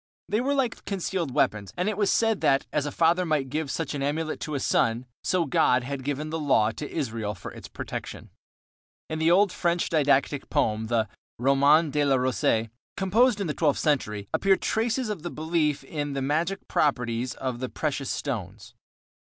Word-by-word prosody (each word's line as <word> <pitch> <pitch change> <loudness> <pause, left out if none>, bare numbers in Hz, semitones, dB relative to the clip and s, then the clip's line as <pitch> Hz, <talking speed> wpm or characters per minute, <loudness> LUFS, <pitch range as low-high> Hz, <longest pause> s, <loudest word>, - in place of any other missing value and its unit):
They 215 +3 +1
were 280 +3 0
like 255 -4 -1
concealed 190 -4 -2
weapons, 100 -5 0
and 180 +3 0
it 215 - 0
was 205 -1 +2
said 225 -2 +2
that, 135 0 +3
as 150 -1 0
a - - -3
father 170 +4 +3
might 150 -6 0
give 155 -1 -2
such 160 0 -3
an 145 - -3
amulet 155 +3 -2
to 150 - -4
a - - 0
son, 115 -1 +1 0.2
so 180 -2 +1
God 125 -2 +3
had 135 +1 -5
given 145 +3 -3
the 160 - -2
Law 120 -7 +3
to 145 +5 -7
Israel 110 -8 -3
for 90 - -8
its - - -10
protection. - - -7 0.8
In 160 - -2
the 160 +1 +3
Old 195 +2 +5
French 175 -1 0
didactic 145 -2 +2
poem, 110 0 0
the 110 -1 +1 0.3
Roman 140 +5 +4
de 150 0 +1
la 140 -2 +3
Rose, 125 -3 +1 0.3
composed 210 +4 +3
in 200 - -1
the 150 - -2
twelfth 150 -3 +1
century, 105 -9 0
appear 195 -1 +4
traces 230 +3 0
of 210 -6 -4
the 175 - -4
belief 155 -3 0
in 145 0 -4
the 135 - -2
magic 160 +7 -1
properties 125 -3 0
of 130 -2 -4
precious 140 -3 -2
stones. 105 -7 -4
145 Hz, 185 wpm, -26 LUFS, 130-170 Hz, 0.8 s, Old